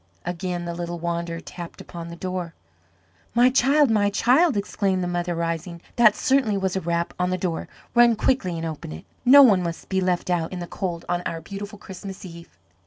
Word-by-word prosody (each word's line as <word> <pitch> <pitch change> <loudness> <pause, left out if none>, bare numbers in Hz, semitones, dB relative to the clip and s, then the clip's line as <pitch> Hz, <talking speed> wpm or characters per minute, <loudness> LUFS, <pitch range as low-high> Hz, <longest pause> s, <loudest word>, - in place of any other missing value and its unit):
Again 175 0 -3
the 170 - -3
little 175 0 -4
wanderer 170 0 -3
tapped 170 0 -9
upon 170 -1 -8
the 170 - -8
door. 180 -1 -4 0.8
"My 245 +2 +5
child, 275 +1 +4
my 205 -2 +3
child," 260 +7 +3
exclaimed 195 -2 0
the - - -1
mother, 175 0 -2
rising, 170 +1 -3 0.2
"that 225 -4 +6
certainly 260 -7 +2
was 190 -1 -1
a 190 - -1
rap 170 +1 -1
on 180 0 +1
the 185 - 0
door. 175 -3 -3 0.3
Run 240 -1 +6
quickly 210 -7 0
and 165 - -4
open 155 - -6
it. 80 - -10 0.2
No 280 +3 +9
one 205 -8 +5
must 170 -1 -5
be 190 -1 +1
left 180 0 0
out 165 -2 0
in 185 - -5
the 175 - -4
cold 175 -2 -4
on 175 0 0
our 165 - -4
beautiful 200 +5 -8
Christmas 190 0 -9
Eve." 170 - -12
180 Hz, 200 wpm, -24 LUFS, 170-205 Hz, 0.8 s, No